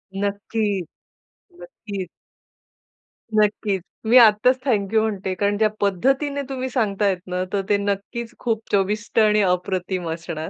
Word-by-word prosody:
नक्की. 200 0 -1 0.8
नक्कीच. 205 - -7 1.3
नक्कीच, 210 -2 +1 0.2
मी 235 +3 +6
आत्ताच 235 +2 +6
थँक 210 -6 0
यू 220 - +4
म्हणते 200 -4 -2
कारण 205 0 +1
ज्या 215 0 +3
पद्धतीने 270 - +1
तुम्ही 260 -1 -3
सांगतायत 205 -6 +1
ना, 180 0 -2
तर 200 - +1
ते 205 - +4
नक्कीच 205 +4 -3
खूप 225 -2 -1
चविष्ट 210 +3 0
आणि 215 -1 +4
अप्रतिम 180 -1 -2
असणार. 165 -1 -5
205 Hz, 125 wpm, -22 LUFS, 195-225 Hz, 1.3 s, मी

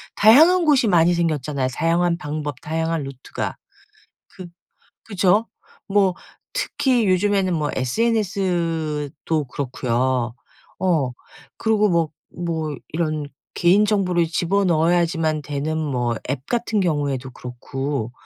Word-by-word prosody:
다양한 320 - +6
곳이 275 -7 +4
많이 175 -2 +4
생겼잖아요 150 -5 -1
다양한 170 +2 +1
방법 150 -4 -5
다양한 160 0 -2
루트가. 135 -1 -6 0.7
그 185 -2 -10 0.6
그쵸? 200 +2 +2 0.4
뭐 195 -2 +2 0.4
특히 260 - +1
요즘에는 190 0 +2
뭐 150 -2 -1
SNS도 165 - -1
그렇고요. 125 -2 -1 0.5
어. 160 -9 +1 0.5
그리고 215 -2 +2
뭐 170 -3 +2 0.3
뭐 160 -3 -2
이런 155 -2 -2 0.3
개인 185 +4 +4
정보를 180 -5 +1
집어넣어야지만 170 -3 +1
되는 145 +2 -3
뭐 125 -6 -1
앱 135 0 -1
같은 235 -3 0
경우에도 140 -6 -1
그렇고. 125 0 -5
165 Hz, 245 characters per minute, -22 LUFS, 145-195 Hz, 0.7 s, 다양한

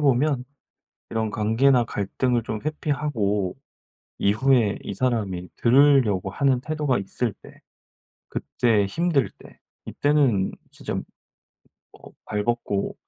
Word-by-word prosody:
보면 140 -1 +2 0.7
이런 110 -1 -1
관계나 120 +5 +3
갈등을 120 +3 -1
좀 110 -1 -4
회피하고 140 -11 -1 0.6
이후에 110 +1 +2
이 - - -5
사람이 100 -6 -1
들으려고 125 -7 +4
하는 135 +4 +1
태도가 150 -2 -1
있을 105 +3 -3
때 - - -16 0.7
그때 115 -5 +1
힘들 145 - +1
때 - - -16 0.3
이때는 140 -10 +2 0.2
진짜 - - -6 1.0
어 - - -15 0.2
발 105 -1 -2
벗고 120 -4 -1
120 Hz, 220 characters per minute, -24 LUFS, 105-140 Hz, 1.0 s, 들으려고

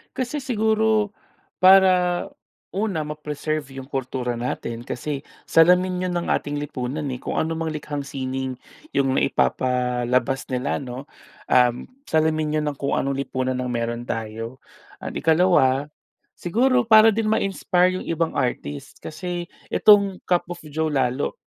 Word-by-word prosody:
Kasi 260 +3 -2
siguro, 220 -4 +1 0.5
para 185 -2 +5 0.5
una, 195 -5 -1
ma-preserve 150 -1 -4
'yung 130 - -9
kultura 130 -2 -3
natin 120 -1 -4
kasi 140 +4 -4 0.3
salamin 180 +2 +4
iyon 180 - -3
ng 175 - -2
ating 145 0 -1
lipunan, 145 0 -4
eh 125 - -5
kung - - -4
ano 160 - -1
mang 165 0 -3
likhang 150 -1 -4
sining 130 -1 -4 0.4
yung 135 -1 +2
naipapalabas 125 0 +1
nila 125 +1 -1
no, 130 -1 -7 0.5
uhm, 125 -1 +3 0.2
salamin 155 -1 +1
'yon 150 - -2
ng 145 - -2
kung 140 - 0
anong 140 0 -1
lipunan 130 -1 -2
ang 125 -1 -2
meron 120 0 -2
tayo. 115 +2 -5 0.4
And - - -5
ikalawa, 155 -5 +3 0.5
siguro 250 +8 +2
para 220 0 +8
din 225 -1 0
ma-inspire 185 -3 +1
'yung - - -9
ibang 165 0 -1
artist 120 - -3
kasi 175 +2 -5 0.2
itong 200 -3 +5
Cup 180 -1 +2
of 175 - -6
Joe 155 +1 -1
lalo, 130 -1 0
150 Hz, 135 wpm, -23 LUFS, 130-180 Hz, 0.5 s, para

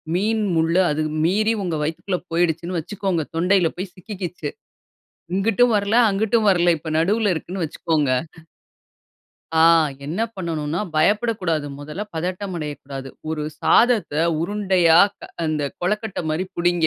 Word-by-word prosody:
மீன் 215 +3 +1
முள் 165 +1 +2
அது 150 +1 0 0.2
மீறி, 215 +6 +2
உங்க 175 -3 -2
வயித்துக்குள்ள 175 +4 -2
போயிடுச்சுன்னு 170 +1 0
வச்சுக்கோங்க, 185 0 -2
தொண்டையில 180 0 +3
போய் 185 0 -5
சிக்கிக்கிச்சு, 180 -5 -6 0.8
இங்கிட்டும் 225 +5 +3
வரல, 205 +2 0 0.2
அங்கிட்டும் 215 +2 +1
வரல, 175 -1 +3
இப்போ 155 +1 -6
நடுவில 205 +3 +2
இருக்குன்னு 175 +2 -4
வச்சுக்கோங்க." 150 -3 0 1.5
"ஆ - - +6 0.4
என்ன 175 +9 -2
பண்ணணும்னா, 165 -2 -2
பயப்படக்கூடாது. 185 -3 +1
முதல்ல 150 +8 -5
பதட்டம் 185 +3 -3
அடையக்கூடாது. 140 -3 -6 0.2
ஒரு 155 -1 -2 0.2
சாதத்த 225 - +3 0.3
உருண்டையா 185 -3 +3 0.2
க - - -10 0.2
அந்த 155 -2 -1 0.2
கொழக்கட்டை 210 +3 -2
மாரி 160 +4 -1
புடிங்க. 175 -1 +2
175 Hz, 120 wpm, -22 LUFS, 160-200 Hz, 1.5 s, ஆ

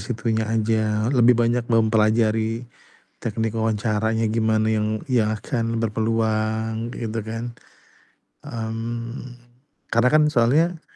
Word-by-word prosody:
situnya 110 0 -1
aja, 110 -1 +1
lebih 125 -2 +5
banyak 120 0 +1
mempelajari 110 +1 +2 0.6
teknik 115 0 -2
wawancaranya 110 0 0
gimana 110 -1 +1
yang 105 -1 0 0.2
yang 115 -4 +2
akan 115 +1 -2
berpeluang 110 0 -1
gitu 115 -1 -3
kan. 115 +2 -5 0.9
Mmm, 115 +2 -5 0.6
karena 115 +2 +4
kan, 155 0 +6
soalnya 155 +7 +2
115 Hz, 100 wpm, -23 LUFS, 110-115 Hz, 0.9 s, kan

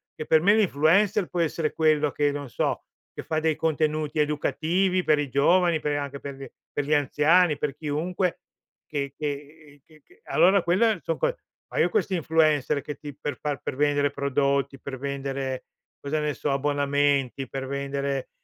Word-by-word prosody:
che, 155 - -6
per 160 0 +4
me, 200 +4 +5
l'influencer 195 +2 +3
può 175 - -4
essere 160 -1 -1
quello, 155 -2 +2
che 145 +1 +1
non 145 -1 -5
so, - - -1 0.3
che - - -6
fa 155 -1 -1
dei 160 -1 +1
contenuti 155 -1 -1
educativi 170 +5 +1
per 150 -1 +3
i 145 - -2
giovani, 170 +5 +3
pe 145 -1 -1
anche 140 -1 -5
per 140 -1 -7
gli 135 0 -9 0.2
per 145 - -2
gli 150 - +1
anziani, 150 +3 +3
per 145 -2 -2
chiunque 165 +5 -2 0.5
che 140 -3 -3
che 145 +1 -5
uhm, 145 - -19
che 155 -1 -21
che 380 +5 -25
allora, 190 +2 +4
quelle 195 +4 +2
son 165 - -2
co - - 0 0.4
ma - - -1
io - - +4
questi 430 - 0
influencer, 155 -4 +2
che 150 - -6
ti 145 0 -8
per 145 -1 -4
far 145 -2 -2
per - - -4
vendere 145 0 +2
prodotti, 140 -1 0
per 130 -2 -7
vendere, 135 -1 -4 0.3
cosa 145 +2 -2
ne 150 -1 -1
so, 145 - -2
abbonamenti, 140 -1 0
per 135 -1 -4
vendere 140 0 -3
150 Hz, 180 wpm, -25 LUFS, 140-160 Hz, 0.5 s, me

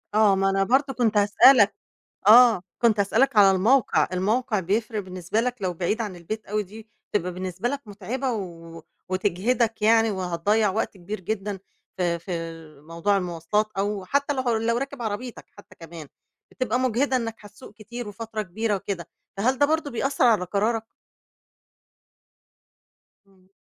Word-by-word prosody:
آه، 215 -2 +5
ما 195 0 +1
أنا 195 0 +1
برضو 270 +6 +1
كنت 225 -3 +1
هاسألك 205 +2 +6 0.5
آه، 230 -4 +7 0.2
كنت 225 -3 +3
هاسألك 230 +5 +2
على 200 -2 +7
الموقع. 220 +7 +3
الموقع 210 +3 0
بيفرق 215 +4 -1
بالنسبة 185 +2 -3
لك 245 +1 -1
لو 180 -2 -1
بعيد 185 +7 -2
عن 205 -5 -4
البيت 210 +6 -6
أوي 210 +1 -1
دي 215 +3 -13 0.2
تبقى 180 -3 -1
بالنسبة 185 +5 -3
لك 280 +1 -3
متعبة 235 +6 -4
و 165 -5 -7 0.3
وتجهدك 210 +5 0
يعني، 225 0 +4
وهتضيّع 190 +3 0
وقت 210 0 -3
كبير 190 +3 -6
جدًا 200 0 -4 0.4
في 175 -2 0
في 180 - -12 0.5
موضوع 170 +6 -1
المواصلات، 180 +3 -1
أو 200 -1 -2
حتى 280 +6 0
لو 245 -3 0
لو 230 +1 0
راكب 275 -1 -5
عربيتك 230 +3 -5
حتى - - -16
كمان، 165 -3 -10 0.4
بتبقى 250 -1 -1
مجهدة 260 +2 +1
إنك 230 -2 -3
هتسوق 210 +2 -14
كتير 225 +1 -8
وفترة 220 +1 -5
كبيرة 210 +3 -2
وكده، 190 -3 -5 0.3
فهل 250 +6 +1
ده 285 - +4
برضو 315 -1 -1
بيأثر 270 +2 0
على 215 -6 +3
قرارك؟ 220 +4 -1 2.4
إمم. 190 -1 -27
210 Hz, 150 wpm, -24 LUFS, 190-235 Hz, 2.4 s, آه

